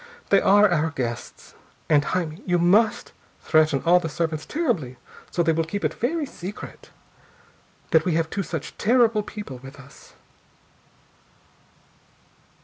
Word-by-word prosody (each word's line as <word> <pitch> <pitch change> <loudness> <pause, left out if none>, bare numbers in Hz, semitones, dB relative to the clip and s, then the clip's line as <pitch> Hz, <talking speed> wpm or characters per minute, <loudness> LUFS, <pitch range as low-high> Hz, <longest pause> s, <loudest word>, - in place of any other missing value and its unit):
They 195 - +5
are 205 +2 +5
our 160 -4 +1
guests! 120 -6 -6 0.3
And, 145 -2 +4
Jaime, 175 -1 -3
you 180 -1 +2
must 200 +6 +2 0.3
threaten 155 -3 +2
all 175 +2 +6
the 165 -2 -4
servants 160 -1 -3
terribly 200 - -2 0.3
so 170 - 0
they 165 - +2
will 165 +1 0
keep 200 +6 -4
it - - 0
very 300 +6 -1
secret 200 -6 -9 1.0
that 160 -1 +4
we 180 -3 0
have 165 -1 +1
two 195 - -3
such 160 -4 -6
terrible 230 -1 +3
people 205 - -8
with 135 +2 -12
us." 140 0 -16
170 Hz, 140 wpm, -24 LUFS, 155-205 Hz, 1.0 s, all